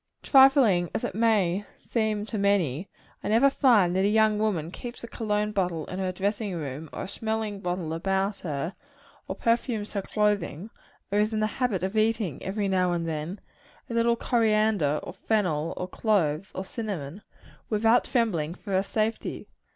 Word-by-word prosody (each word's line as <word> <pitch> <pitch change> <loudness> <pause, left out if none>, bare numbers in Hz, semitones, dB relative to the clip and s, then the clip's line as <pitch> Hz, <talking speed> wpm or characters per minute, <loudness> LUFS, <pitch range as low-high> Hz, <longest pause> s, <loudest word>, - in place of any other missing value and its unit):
Trifling 265 - +5
as - - -2
it - - -2
may 205 -4 +2 0.2
seem 215 -3 0
to 215 -1 -4
many, 195 -5 +1 0.3
I - - -3
never 235 +6 +4
find 215 -11 +4
that 190 - +2
a - - +4
young 215 0 +3
woman 180 -7 -1
keeps 240 +5 -8
a - - -5
cologne 210 -2 -1
bottle 180 -6 -1
in 185 - -6
her 185 -1 -1
dressing 200 +1 -2
room, 150 0 -5
or - - -5
a - - -5
smelling 220 0 -3
bottle 175 -3 -3
about 195 +3 -1
her 160 +2 -3 0.5
or - - -4
perfumes 230 -2 0
her 200 - -1
clothes 205 -5 0 0.5
or 205 - +2
is 215 +1 +1
in 215 - 0
the 215 - +2 0.2
habit 210 -8 +1
of 190 +3 -2
eating, 215 - +1
every 200 +1 -2
now 185 -2 +2
and 170 -1 -2
then, 160 +4 -4 0.5
a - - -3
little 235 0 +3
coriander, 215 - +2
or - - -7
fennel, 170 -8 0
or 180 - -3
cloves, 185 -5 0
or 190 - -4
cinnamon 195 - -5 0.5
without 225 +2 +3
trembling 180 - 0
for 200 - -9
her 190 0 +3
safety. 215 +3 -2
200 Hz, 175 wpm, -27 LUFS, 180-220 Hz, 0.5 s, Trifling